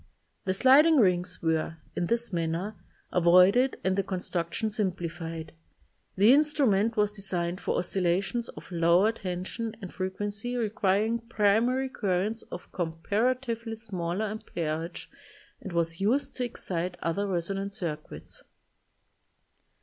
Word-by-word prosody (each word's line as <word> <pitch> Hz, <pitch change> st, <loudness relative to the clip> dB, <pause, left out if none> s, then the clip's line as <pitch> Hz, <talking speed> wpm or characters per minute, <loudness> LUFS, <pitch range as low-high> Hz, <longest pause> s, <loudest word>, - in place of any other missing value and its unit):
The 185 Hz, -, +1 dB
sliding 290 Hz, +8 st, +6 dB
rings 180 Hz, -5 st, +2 dB
were, 160 Hz, 0 st, 0 dB, 0.2 s
in 175 Hz, -, -1 dB
this 235 Hz, -1 st, -1 dB
manner, 170 Hz, +5 st, -1 dB, 0.4 s
avoided 185 Hz, +9 st, +5 dB
and 190 Hz, 0 st, +2 dB
the 195 Hz, -, +2 dB
construction 185 Hz, +2 st, -2 dB
simplified. 165 Hz, -5 st, -3 dB, 0.6 s
The 210 Hz, +6 st, +6 dB
in 285 Hz, -, +7 dB
strument 235 Hz, -8 st, +2 dB
was 210 Hz, 0 st, +3 dB
designed 185 Hz, -3 st, -3 dB
for -, -, -1 dB
oscillations 190 Hz, +6 st, 0 dB
of -, -, -11 dB
lower 175 Hz, +5 st, +4 dB
tension 200 Hz, +3 st, -4 dB
and 190 Hz, -5 st, -8 dB
frequency 205 Hz, +5 st, -3 dB
requiring 215 Hz, 0 st, +1 dB
pri 220 Hz, -3 st, +2 dB
mary 255 Hz, +3 st, +1 dB
currents 210 Hz, -1 st, -1 dB
of -, -, -8 dB
comparatively 225 Hz, +7 st, -1 dB
smaller 195 Hz, -3 st, -3 dB
amperage 170 Hz, -6 st, -4 dB, 0.5 s
and 200 Hz, -7 st, -7 dB
was 170 Hz, 0 st, -1 dB
used 245 Hz, +8 st, +1 dB
to 250 Hz, -, 0 dB
excite 180 Hz, -6 st, -3 dB
other 185 Hz, +5 st, 0 dB
resonant 195 Hz, +2 st, -2 dB
circuits. 155 Hz, -6 st, -6 dB
195 Hz, 120 wpm, -28 LUFS, 175-225 Hz, 0.6 s, in